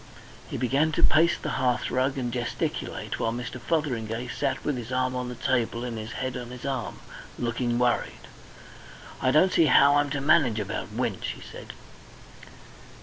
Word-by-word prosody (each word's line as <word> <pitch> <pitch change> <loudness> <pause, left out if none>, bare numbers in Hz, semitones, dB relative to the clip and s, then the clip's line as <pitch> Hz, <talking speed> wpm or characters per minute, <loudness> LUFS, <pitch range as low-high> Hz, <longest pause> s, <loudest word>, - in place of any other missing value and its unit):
He - - -3
began 135 +6 +2
to - - 0
pace 170 +3 +5
the - - -3
hearthrug 130 +1 +1
and 120 -2 -2
gesticulate, 120 -1 -3
while 115 - +1
Mr. 120 +1 -5
Fotheringay 120 -5 -1
sat 130 +3 -2
with 145 - 0
his 120 0 -6
arm 130 0 0
on 125 -1 -3
the 125 - -6
table 120 -1 0
and 120 -2 -4
his 110 +1 -6
head 130 -1 -3
on 125 -1 -5
his 125 0 -9
arm, 130 -5 -3 0.4
looking 120 0 -1
worried. 120 -1 0 0.9
"I 130 - +3
don't 155 +8 +4
see 165 - +5
how 145 0 +6
I'm 145 0 +2
to 145 +1 -2
manage 135 -6 +3
about 105 0 -4
Winch," 115 -3 -2
he - - -13
said. - - -10
125 Hz, 170 wpm, -27 LUFS, 120-135 Hz, 0.9 s, how